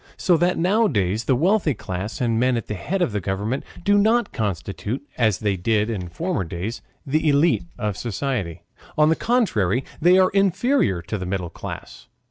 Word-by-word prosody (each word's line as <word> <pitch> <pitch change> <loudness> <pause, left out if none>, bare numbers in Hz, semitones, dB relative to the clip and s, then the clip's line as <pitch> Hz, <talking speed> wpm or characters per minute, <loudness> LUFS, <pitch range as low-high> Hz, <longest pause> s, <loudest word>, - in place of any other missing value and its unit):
So 180 - +3
that 175 +2 +1
nowadays 120 - +1
the 130 - +3
wealthy 170 - +2
class 95 +4 -5
and 115 -2 +1
men 125 0 +2
at 115 - -4
the - - -4
head 175 - -1
of 115 - -1
government 100 +8 -2 0.2
do 205 +2 +4
not 230 +3 +2
constitute, 105 - -3
as 110 -6 +2
they 105 -2 0
did 105 +4 0
in 90 -5 -4
former 170 - -2
days, 90 +8 -5 0.2
the 150 +3 +1
ÉLITE 150 +4 +3
of 105 -4 -2
society; 105 - -3 0.3
on 155 0 +5
the 160 - +3
contrary, 135 - +1 0.2
they 175 +3 +6
are 185 -1 +4
inferior 195 - +2
to 95 +4 -4
the 95 - -4
middle 90 -2 -3
class. - - -8
120 Hz, 175 wpm, -22 LUFS, -, 0.3 s, they